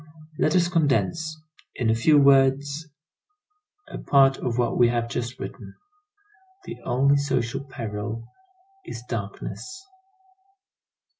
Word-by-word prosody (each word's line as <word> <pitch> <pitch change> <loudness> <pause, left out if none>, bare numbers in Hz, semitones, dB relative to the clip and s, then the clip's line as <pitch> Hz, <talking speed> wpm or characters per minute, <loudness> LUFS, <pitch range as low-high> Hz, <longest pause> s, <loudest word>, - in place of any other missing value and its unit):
Let 155 - +2
us 175 -1 +4
condense, 160 0 0 0.4
in 115 -3 +1
a - - +4
few 145 +7 +4
words, 140 +2 +3 1.0
a - - -8
part 135 -1 +4
of 120 -2 -2
what 120 -1 +1
we 120 - +5
have 120 -1 -1
just 120 +2 -4
written. - - -8 0.9
The - - -7
only 140 +3 +3
social 130 -3 -1
peril 110 -3 -5 0.6
is 120 - -8
darkness. 125 - -6
135 Hz, 115 wpm, -24 LUFS, 120-145 Hz, 1.0 s, we